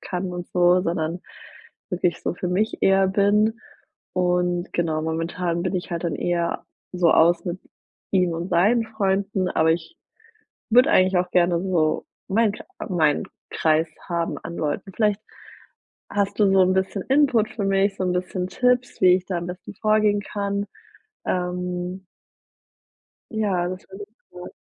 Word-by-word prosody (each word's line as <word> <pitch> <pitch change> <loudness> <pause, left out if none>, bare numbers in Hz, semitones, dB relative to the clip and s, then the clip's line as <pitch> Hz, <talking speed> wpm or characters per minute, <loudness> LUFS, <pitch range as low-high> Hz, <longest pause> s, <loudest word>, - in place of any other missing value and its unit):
kann 185 0 -4
und 175 0 -6
so 180 0 +4
sondern 165 0 -2 0.7
wirklich 180 -1 0
so - - -2
für 180 - -4
mich 205 +5 -1
eher 195 0 +4
bin. 210 +3 +2 0.6
Und 180 -1 0
genau, 160 -2 0
momentan 165 +2 -2
bin 185 +1 -2
ich 180 - -5
halt 170 - -3
dann 170 - -1
eher 170 -1 -1 0.3
so 175 -2 +3
aus 170 +1 +4
mit 180 +1 -4 0.5
ihm 180 -3 +2
und 170 +2 -4
seinen 210 +7 +3
Freunden 195 -3 -1
aber 160 -2 +2
ich 170 - -5 0.7
würde 250 +7 +6
eigentlich 185 - +4
auch 180 0 -1
gerne 175 -1 +3
so 170 -5 0 0.2
mein 215 +2 +3
Krei - - -11 0.2
meinen 160 -5 +2 0.3
Kreis 160 0 +2 0.2
haben 170 -1 -2
an 170 +1 -8
Leuten. 155 +6 -3
Vielleicht 210 -2 +1 0.9
hast 200 0 -1
du 200 -2 +5
so 190 - +6
'n 185 0 +3
bisschen 190 +1 -1
Input 265 -6 +3
für 205 - -4
mich, 195 0 +2
so 190 - -3
'n 180 - 0
bisschen 180 0 -2
Tipps, 250 +4 0
wie 180 -1 +7
ich 185 - -7
da 180 -3 -2
am 170 - -5
besten 180 +3 -8
vorgehen 215 0 +2
kann? 200 0 -3 0.6
Ähm 180 +1 -3 1.3
ja, 200 -6 0
das 185 +1 -5
wäre 195 +2 -8 0.3
super. 180 0 -9
185 Hz, 155 wpm, -23 LUFS, 175-200 Hz, 1.3 s, wie